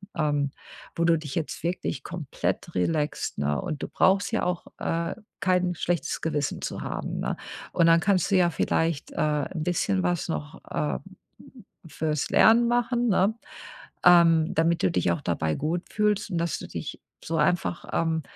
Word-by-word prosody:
ähm, 145 Hz, -2 st, 0 dB, 0.4 s
wo 170 Hz, -, 0 dB
du 165 Hz, -1 st, +4 dB
dich 150 Hz, -3 st, -7 dB
jetzt 160 Hz, -3 st, -3 dB
wirklich 170 Hz, -5 st, -2 dB
komplett 165 Hz, -6 st, -3 dB
relaxt, 150 Hz, -, -1 dB
ne? 70 Hz, 0 st, 0 dB
Und 150 Hz, -, -4 dB
du -, -, -2 dB
brauchst 195 Hz, +3 st, +3 dB
ja 225 Hz, -, 0 dB
auch, 180 Hz, -1 st, -2 dB
äh, 165 Hz, 0 st, -1 dB, 0.3 s
kein 180 Hz, -1 st, +2 dB
schlechtes 170 Hz, -2 st, -1 dB
Gewissen 150 Hz, -3 st, -1 dB
zu -, -, -4 dB
haben, -, -, -4 dB
ne? -, -, -1 dB, 0.4 s
Und 170 Hz, -, +4 dB
dann 165 Hz, 0 st, +6 dB
kannst 195 Hz, 0 st, +1 dB
du -, -, +4 dB
ja 175 Hz, -1 st, +4 dB
vielleicht, 165 Hz, -2 st, 0 dB
äh, -, -, -12 dB, 0.4 s
'n 160 Hz, -4 st, -3 dB
bisschen 100 Hz, -, 0 dB
was 90 Hz, 0 st, 0 dB
noch, 75 Hz, -2 st, -5 dB
ähm, 75 Hz, -4 st, -1 dB, 0.9 s
fürs 155 Hz, -2 st, -2 dB
Lernen 235 Hz, +2 st, +6 dB
machen, 240 Hz, 0 st, +1 dB
ne, 200 Hz, +2 st, +3 dB, 0.7 s
ähm, 165 Hz, -2 st, +6 dB
damit 165 Hz, +2 st, +2 dB
du -, -, +3 dB
dich 170 Hz, -, +1 dB
auch 155 Hz, -, -3 dB
dabei 80 Hz, -, 0 dB
gut 165 Hz, -, -1 dB
fühlst 210 Hz, -1 st, +1 dB
und 175 Hz, -, -2 dB
dass 170 Hz, -1 st, -1 dB
du -, -, -8 dB
dich -, -, -6 dB, 0.2 s
so 165 Hz, -, -2 dB
einfach, 175 Hz, -1 st, 0 dB
ähm, 165 Hz, -1 st, 0 dB
165 Hz, 170 wpm, -26 LUFS, 150-180 Hz, 0.9 s, dann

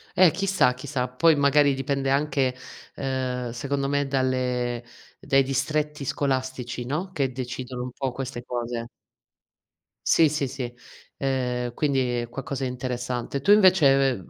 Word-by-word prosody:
Eh, 180 Hz, -4 st, +7 dB
chissà, 190 Hz, -7 st, +2 dB
chi 130 Hz, +3 st, -10 dB
sa. 130 Hz, -3 st, -1 dB
Poi, 160 Hz, +5 st, +4 dB
magari, 140 Hz, 0 st, +4 dB
dipende 135 Hz, 0 st, -1 dB
anche, 140 Hz, -2 st, +1 dB, 0.4 s
ehm, 130 Hz, -2 st, -2 dB
secondo 135 Hz, +3 st, -2 dB
me, 145 Hz, -1 st, +1 dB
dalle 125 Hz, -2 st, 0 dB, 0.4 s
dai 135 Hz, 0 st, +3 dB
distretti 150 Hz, +2 st, -1 dB
scolastici, 130 Hz, -4 st, -2 dB
no, 175 Hz, +8 st, -3 dB
che 140 Hz, -6 st, -1 dB
decidono 125 Hz, 0 st, -5 dB
un 125 Hz, -, -5 dB
po' 135 Hz, 0 st, -3 dB
queste 125 Hz, -1 st, -5 dB
cose. 120 Hz, -1 st, -3 dB, 1.2 s
Sì, 160 Hz, -2 st, +5 dB
sì, 145 Hz, -2 st, -1 dB
sì, 125 Hz, -2 st, -5 dB, 0.4 s
ehm, 125 Hz, -3 st, -1 dB
quindi 130 Hz, -4 st, +1 dB
è 120 Hz, -, -6 dB
qualcosa 135 Hz, +1 st, -5 dB
di 130 Hz, -, 0 dB
interessante. 125 Hz, +1 st, -3 dB
Tu, 200 Hz, -, +3 dB
invece, 140 Hz, -, +5 dB
135 Hz, 140 wpm, -25 LUFS, 125-140 Hz, 1.2 s, Eh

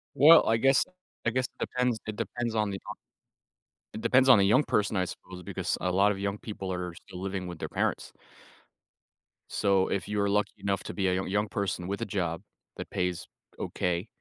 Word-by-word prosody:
Well, 155 Hz, +4 st, +8 dB
I 115 Hz, -, +4 dB
guess 135 Hz, +2 st, +4 dB, 0.4 s
I 115 Hz, -, +4 dB
guess 130 Hz, +2 st, 0 dB
it -, -, -11 dB
depends 125 Hz, -2 st, 0 dB
it 110 Hz, -, -3 dB
depends 120 Hz, 0 st, -3 dB
on 105 Hz, -2 st, +1 dB
the, 95 Hz, -, -3 dB
uh -, -, -3 dB, 1.0 s
it 110 Hz, -, -5 dB
depends 130 Hz, +1 st, +4 dB
on 125 Hz, -, +9 dB
the 100 Hz, -, +4 dB
young 130 Hz, +8 st, +4 dB
person, 105 Hz, 0 st, +1 dB
I 90 Hz, -1 st, +1 dB
suppose, 90 Hz, 0 st, -9 dB
because -, -, -2 dB
a 90 Hz, -, 0 dB
lot 100 Hz, +3 st, +4 dB
of 95 Hz, -, -6 dB
young 100 Hz, 0 st, -2 dB
people 100 Hz, -4 st, -6 dB
are 90 Hz, -1 st, -3 dB
still 90 Hz, +1 st, -11 dB
living 95 Hz, -1 st, -3 dB
with 85 Hz, -2 st, -7 dB
their -, -, -5 dB
parents. -, -, -1 dB, 1.4 s
So, 95 Hz, -2 st, +2 dB
if 95 Hz, -2 st, -2 dB
you're 100 Hz, -1 st, 0 dB
lucky 105 Hz, 0 st, +1 dB
enough 100 Hz, -1 st, -1 dB
to -, -, -6 dB
be 95 Hz, -2 st, 0 dB
a 90 Hz, -, +2 dB
yo 95 Hz, -, -1 dB
young 105 Hz, +2 st, 0 dB
person 95 Hz, -3 st, -2 dB
with 100 Hz, +1 st, -3 dB
a -, -, 0 dB
job 85 Hz, -5 st, -2 dB, 0.3 s
that -, -, -6 dB
pays 90 Hz, -1 st, -2 dB, 0.3 s
okay, 90 Hz, +3 st, -2 dB
100 Hz, 205 wpm, -29 LUFS, 95-110 Hz, 1.4 s, on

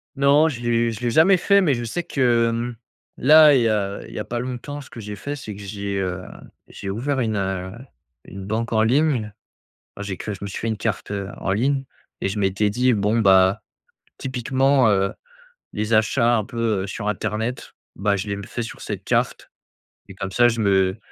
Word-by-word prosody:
Non, 140 Hz, +3 st, +4 dB
je 120 Hz, -6 st, -6 dB
l'ai 120 Hz, -1 st, +1 dB
je 110 Hz, 0 st, -8 dB
l'ai 120 Hz, -1 st, 0 dB
jamais 180 Hz, +9 st, +5 dB
fait, 200 Hz, +3 st, +4 dB
mais 150 Hz, -8 st, +2 dB
je 120 Hz, -, -4 dB
sais 145 Hz, +10 st, -3 dB
que, 120 Hz, -7 st, +2 dB
mmh, 120 Hz, +1 st, -3 dB, 0.4 s
là, 155 Hz, +2 st, +7 dB
il 130 Hz, -, +4 dB
y 115 Hz, -, +2 dB
a 100 Hz, -2 st, -1 dB
il -, -, -12 dB
y -, -, -5 dB
a -, -, -4 dB
pas 120 Hz, -, -3 dB
longtemps, 130 Hz, +4 st, -5 dB
ce 135 Hz, -, -14 dB
que -, -, -10 dB
j'ai 105 Hz, -1 st, -6 dB
fait, 140 Hz, +8 st, -5 dB
c'est 110 Hz, -7 st, -8 dB
que 100 Hz, -, -10 dB
j'ai, 100 Hz, 0 st, -4 dB
heu, 95 Hz, -1 st, -3 dB, 0.4 s
j'ai 95 Hz, -, -8 dB
ouvert 130 Hz, +7 st, -1 dB
une, 110 Hz, -3 st, 0 dB
heu, 95 Hz, -1 st, -2 dB, 0.5 s
une 95 Hz, +1 st, -9 dB
banque 115 Hz, +3 st, -2 dB
en 110 Hz, -, +3 dB
ligne. 125 Hz, -2 st, +2 dB, 0.6 s
Ah -, -, -8 dB
j'ai 100 Hz, -2 st, -4 dB
que 105 Hz, -, -5 dB
je 95 Hz, -, -9 dB
me 100 Hz, -, -4 dB
suis 100 Hz, -, -6 dB
fait 115 Hz, -, -3 dB
une 110 Hz, -, 0 dB
carte, 110 Hz, -1 st, -3 dB
heu, 100 Hz, -1 st, -3 dB
en 95 Hz, -, -2 dB
ligne 135 Hz, +6 st, 0 dB, 0.4 s
et -, -, 0 dB
je 100 Hz, -, -4 dB
m'étais 100 Hz, +1 st, +1 dB
dit: 125 Hz, +4 st, +2 dB
«Bon 105 Hz, +2 st, +1 dB
bah, 95 Hz, -2 st, +4 dB, 0.6 s
typiquement, 130 Hz, 0 st, +2 dB
heu, 100 Hz, -1 st, +2 dB, 0.6 s
les 105 Hz, +2 st, -3 dB
achats 115 Hz, +2 st, +3 dB
un 110 Hz, -, 0 dB
peu, 115 Hz, -5 st, -1 dB
heu, -, -, -4 dB
sur 100 Hz, +1 st, -4 dB
internet 110 Hz, +4 st, -3 dB, 0.2 s
bah, 100 Hz, +1 st, +1 dB
je 95 Hz, +2 st, -4 dB
les 100 Hz, -, -1 dB
m 100 Hz, 0 st, -7 dB
fais 120 Hz, -, -5 dB
sur 115 Hz, -, -8 dB
cette -, -, -5 dB
carte» -, -, -1 dB, 0.6 s
et 95 Hz, -, -10 dB
comme 95 Hz, 0 st, -5 dB
ça 120 Hz, +5 st, +4 dB
je 115 Hz, -1 st, 0 dB
me 95 Hz, -1 st, +2 dB
110 Hz, 220 wpm, -22 LUFS, 100-125 Hz, 0.6 s, là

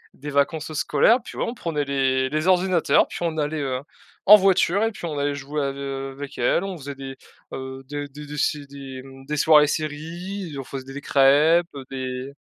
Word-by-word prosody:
des 145 Hz, +2 st, -7 dB
vacances 155 Hz, +2 st, 0 dB
scolaires, 155 Hz, -, +3 dB
puis -, -, -10 dB
ouais, -, -, 0 dB
on 235 Hz, -, -3 dB
prenait 160 Hz, -9 st, -2 dB
les 130 Hz, -1 st, +1 dB
les 155 Hz, +4 st, -1 dB
ordinateurs, 185 Hz, -2 st, +3 dB
puis -, -, -7 dB
on 165 Hz, -2 st, -1 dB
allait, 150 Hz, 0 st, -1 dB
heu, 130 Hz, -2 st, -2 dB, 0.5 s
en 210 Hz, -, +11 dB
voiture 195 Hz, 0 st, +3 dB
et 225 Hz, -, +1 dB
puis 200 Hz, -, -8 dB
on 155 Hz, -3 st, -4 dB
allait 145 Hz, 0 st, 0 dB
jouer 140 Hz, +2 st, -4 dB
ave 140 Hz, 0 st, -3 dB
avec 135 Hz, 0 st, -6 dB
elle, 125 Hz, +8 st, +2 dB
on 190 Hz, -2 st, -5 dB
faisait 140 Hz, -2 st, -7 dB
des, 135 Hz, 0 st, -8 dB, 0.4 s
heu, 130 Hz, 0 st, -6 dB
des 145 Hz, 0 st, -4 dB
des 150 Hz, +1 st, -9 dB
se 150 Hz, -, +1 dB
des, 135 Hz, -2 st, -9 dB
mmh 135 Hz, 0 st, -13 dB
des 150 Hz, +2 st, -3 dB
soirées 150 Hz, -1 st, +6 dB
séries, 165 Hz, +4 st, -4 dB
on -, -, -4 dB
faisait 135 Hz, 0 st, -7 dB
des 140 Hz, -, -5 dB
crêpes, 150 Hz, +6 st, +4 dB
heu, 135 Hz, -2 st, -7 dB
des 130 Hz, 0 st, -5 dB
145 Hz, 200 wpm, -23 LUFS, 135-160 Hz, 0.5 s, en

